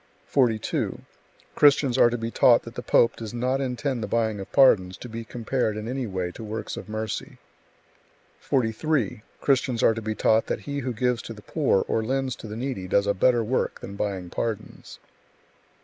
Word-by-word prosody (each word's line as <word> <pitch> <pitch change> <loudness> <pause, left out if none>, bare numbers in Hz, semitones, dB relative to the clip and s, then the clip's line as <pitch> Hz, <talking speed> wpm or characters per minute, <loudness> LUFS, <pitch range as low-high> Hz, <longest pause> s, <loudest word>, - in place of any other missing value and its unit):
42. 120 -6 0 0.6
Christians 140 -3 +4
are 120 - +6
to 120 - -2
be 115 0 -4
taught 120 0 +5
that 115 - -10
the - - -5
pope 115 - +3
does 115 0 -7
not 130 +3 0
intend 130 -1 -2
the 105 - -3
buying 110 -3 0
of 95 - -8
pardons 95 -10 +4
to - - -9
be 115 0 -6
compared 115 -1 -2
in 110 +1 -5
any 130 0 -3
way 95 -3 -3
to 110 - -9
works 110 +1 -5
of - - -8
mercy. 110 0 -4 1.0
43. 120 -1 0 0.2
Christians 130 -3 +1
are - - +5
to 115 - -5
be 110 0 -3
taught 110 +1 +2
that - - -2
he 145 0 -4
who 130 -1 -3
gives 125 +1 0
to 115 - -8
the 105 -1 -13
poor 140 -6 +1
or 110 - 0
lends 130 +2 -1
to - - -9
the 105 +1 -6
needy 125 -7 -4
does 100 +2 +2
a 100 - +2
better 120 +4 +3
work 125 +4 -1
than 100 - -7
buying 95 -4 -3
pardons; 115 -3 -5
44. - - -32
115 Hz, 195 wpm, -25 LUFS, 110-130 Hz, 1.0 s, are